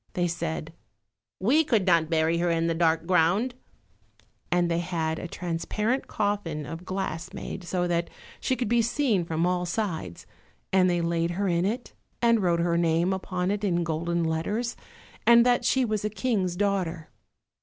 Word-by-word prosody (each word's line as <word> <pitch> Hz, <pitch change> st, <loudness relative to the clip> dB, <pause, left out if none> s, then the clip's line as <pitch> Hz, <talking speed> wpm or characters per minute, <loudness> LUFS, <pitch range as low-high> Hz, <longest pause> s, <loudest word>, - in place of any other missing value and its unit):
They 175 Hz, -1 st, +1 dB
said, 80 Hz, -, -4 dB, 0.7 s
"We 265 Hz, +12 st, +4 dB
could 225 Hz, -10 st, +1 dB
not 170 Hz, -4 st, +3 dB
bury 165 Hz, 0 st, +2 dB
her 175 Hz, 0 st, +1 dB
in 165 Hz, 0 st, +1 dB
the 165 Hz, -, +1 dB
dark 165 Hz, -1 st, +2 dB
ground," 185 Hz, +8 st, +2 dB, 1.0 s
and 175 Hz, -1 st, +3 dB
they 170 Hz, 0 st, 0 dB
had 160 Hz, -2 st, -2 dB
a 180 Hz, -, -5 dB
transparent 180 Hz, +9 st, -2 dB
coffin 200 Hz, -8 st, -2 dB
of 165 Hz, +4 st, -7 dB
glass 185 Hz, -4 st, -4 dB
made, 185 Hz, -, -6 dB
so 180 Hz, 0 st, -1 dB
that 170 Hz, -1 st, 0 dB, 0.3 s
she 260 Hz, -, 0 dB
could 250 Hz, -, -2 dB
be 235 Hz, +2 st, +3 dB
seen 230 Hz, -, +1 dB
from 165 Hz, 0 st, 0 dB
all 180 Hz, 0 st, 0 dB
sides, 170 Hz, -, -3 dB, 0.5 s
and 185 Hz, -1 st, +5 dB
they 175 Hz, -1 st, +1 dB
laid 170 Hz, 0 st, 0 dB
her 200 Hz, 0 st, 0 dB
in 170 Hz, 0 st, +1 dB
it, 235 Hz, +5 st, -3 dB, 0.3 s
and 235 Hz, -2 st, +3 dB
wrote 170 Hz, -2 st, +2 dB
her 170 Hz, 0 st, +1 dB
name 170 Hz, +2 st, +2 dB
upon 185 Hz, -1 st, -2 dB
it 205 Hz, 0 st, -2 dB
in 175 Hz, -4 st, +1 dB
golden 170 Hz, +1 st, -1 dB
letters, 185 Hz, +9 st, -1 dB, 0.5 s
and 235 Hz, 0 st, +7 dB
that 245 Hz, -1 st, +3 dB
she 265 Hz, -1 st, +3 dB
was 215 Hz, -3 st, -1 dB
a 210 Hz, -, 0 dB
king's 210 Hz, -5 st, -1 dB
daughter. 180 Hz, -5 st, -1 dB
180 Hz, 175 wpm, -27 LUFS, 165-205 Hz, 1.0 s, and